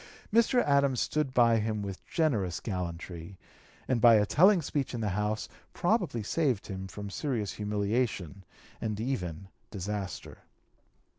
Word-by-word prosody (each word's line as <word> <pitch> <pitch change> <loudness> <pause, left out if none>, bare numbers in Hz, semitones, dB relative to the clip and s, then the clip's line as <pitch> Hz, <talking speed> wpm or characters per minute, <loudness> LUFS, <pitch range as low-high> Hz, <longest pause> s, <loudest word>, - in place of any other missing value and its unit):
Mr. 235 +2 +4
Adams 140 -3 +3
stood 150 -3 0
by 115 -3 +4
him 105 -1 -2
with 100 -2 -6
generous 110 - 0
gallantry, 90 -2 -5 0.5
and 125 -3 +1
by 115 -1 +8
a 105 -1 +4
telling 185 - +5
speech 140 -4 -2
in - - -3
the 105 - 0
House 105 +3 -1 0.3
probably 115 -2 0
saved 130 -3 0
him 95 -1 -6
from 100 +2 -7
serious 115 - -2
humiliation 105 -3 -2 0.4
and 105 -2 -2
even 95 -8 -3 0.2
disaster. 100 0 -5
105 Hz, 135 wpm, -30 LUFS, 100-130 Hz, 0.5 s, by